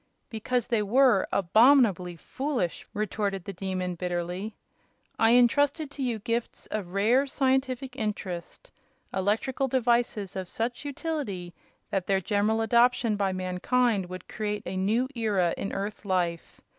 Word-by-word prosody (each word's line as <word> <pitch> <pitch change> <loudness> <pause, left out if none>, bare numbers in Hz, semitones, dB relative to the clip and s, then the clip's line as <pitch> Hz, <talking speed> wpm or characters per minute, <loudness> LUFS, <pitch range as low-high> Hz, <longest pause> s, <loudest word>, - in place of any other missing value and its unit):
"Because 240 +2 -1
they 230 -4 +1
were, 235 0 +4
abominably 200 -2 +4
foolish!" 255 - -3
retorted 205 -2 -2
the 200 - -5
Demon, 185 -1 -3
bitterly. 180 +4 -3 0.6
"I 225 +1 +5
entrusted 285 +5 +3
to 285 - -7
you 245 -4 0
gifts 230 +2 -3
of 190 -4 -4
rare 240 +8 +3
scientific 265 -1 0
interest 210 - -5 0.4
electrical 220 +8 0
devices 235 -6 +1
of 185 -2 -4
such 240 +5 -3
utility 275 - -4 0.4
that 190 -2 -1
their 195 -1 +3
general 210 +3 +1
adoption 235 0 +3
by 200 -2 0
mankind 185 +3 0
would 185 0 -8
create 210 -1 -3
a - - -4
new 215 +7 +1
era 205 -8 +1
in 200 - -4
earth 205 +2 -4
life. 180 -4 -2
215 Hz, 130 wpm, -27 LUFS, 190-250 Hz, 0.6 s, I